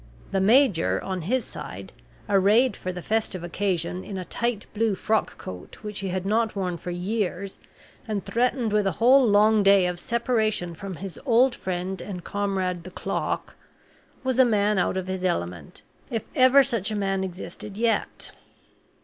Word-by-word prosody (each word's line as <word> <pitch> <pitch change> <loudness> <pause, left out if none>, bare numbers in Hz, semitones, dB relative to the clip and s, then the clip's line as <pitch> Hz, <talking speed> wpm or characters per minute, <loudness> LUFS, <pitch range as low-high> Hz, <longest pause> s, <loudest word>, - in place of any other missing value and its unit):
The 195 - +1
major, 220 -4 +4
on 185 -2 -3
his 245 +10 0
side, - - -8 0.3
arrayed 205 +5 +4
for 185 - -4
the 180 -1 -7
festive 215 -5 -1
occasion 180 0 -2
in 195 - -6
a 185 - -5
tight 235 +2 -2
blue 220 -1 +1
frock 220 +3 0
coat 90 -1 -9
which 210 -1 -4
he 195 - -3
had 185 0 -2
not 220 +2 +1
worn 180 -3 -2
for 180 - -6
years, 190 +1 -3 0.5
and 210 -3 -3
threatened 240 -2 0
with 210 -2 +2
a 190 - 0
whole 255 +8 +5
long 215 -1 +5
day 195 -2 +5
of 180 -1 -2
separation 220 -5 0
from 190 +3 -7
his 195 +1 -7
old 255 0 +4
friend 185 -2 -4
and 180 -4 -6
comrade 190 -3 -2
the 185 - -8
clock, - - -3 0.7
was 260 -1 0
a - - +9
man 210 -4 +2
out 180 - +1
of 190 - -2
his 185 0 -4
element, 85 - -3 0.3
if 225 -3 -2
ever 260 +2 +7
such 230 -5 -1
a 215 - -2
man 195 -2 0
existed 190 +2 -7
yet. 230 0 -1
200 Hz, 170 wpm, -25 LUFS, 185-225 Hz, 0.7 s, a